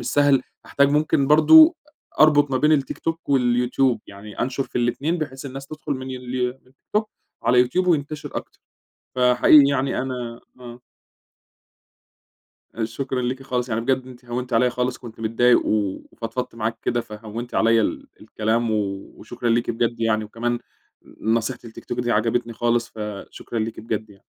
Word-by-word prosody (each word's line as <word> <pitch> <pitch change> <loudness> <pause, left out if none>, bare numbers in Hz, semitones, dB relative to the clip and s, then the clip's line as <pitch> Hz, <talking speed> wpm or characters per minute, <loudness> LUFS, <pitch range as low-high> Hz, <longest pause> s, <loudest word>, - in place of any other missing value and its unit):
مش 120 - -7
سهل، 145 -2 +4 0.2
هاحتاج 140 0 +2
ممكن 150 -2 +2
برضو 310 - +7
أ 300 - -15
أربط 145 -2 +5
ما 130 - +1
بين 150 +4 +3
التيك 140 -3 0
توك 165 -1 -4
واليوتيوب، 125 -1 +2
يعني 100 +1 -10
أنشر 135 +2 -1
في - - -8
ال2 140 +8 0
بحيث 140 -3 -5
الناس 135 +1 -8
تدخل 155 0 -5
من 130 0 -5
التيك 125 +1 -4 0.2
توك 215 0 +1 0.3
على 125 - +3
اليوتيوب 125 +10 +3
وينتشر 150 -3 -1
أكتر، - - -7 0.5
فحقيقي 125 +3 +6
يعني 135 -1 0
أنا 125 -3 -5 0.2
آه. 120 0 -10 1.9
آآ 115 - -2
شكرًا 130 +3 -3
ليكِ 130 +2 -3
خالص، 125 -2 -2
يعني 115 0 -1
بجد 130 +1 0
أنتِ 125 -1 -13
هونتِ 125 +1 -5
عليَّ 125 +2 +3
خالص 125 +1 -2
كنت 115 -3 -11
متضايق، 115 +2 +3
وفضفضت 115 +4 -3
معاكِ 115 0 -3
كده، 120 0 0
فهونتِ 110 +2 -8
عليَّ 115 0 +4
ال - - -2
الكلام 110 +1 -1
و - - +1 0.4
وشكرًا 120 - -5
ليكِ 115 +1 +1
بجد 115 0 -1
يعني 110 -1 +1
وكمان 120 +2 -2 0.5
ن 110 - -3
نصيحة 115 +2 -1
التيك 115 -1 -11
توك - - -3
دي 120 -1 0
عجبتني 115 +2 0
خالص 120 +1 0
فشكرًا 105 +1 -7
ليكِ 110 +1 -3
بجد 110 -1 -4
يعني. 100 - -19
125 Hz, 165 wpm, -22 LUFS, 115-135 Hz, 1.9 s, برضو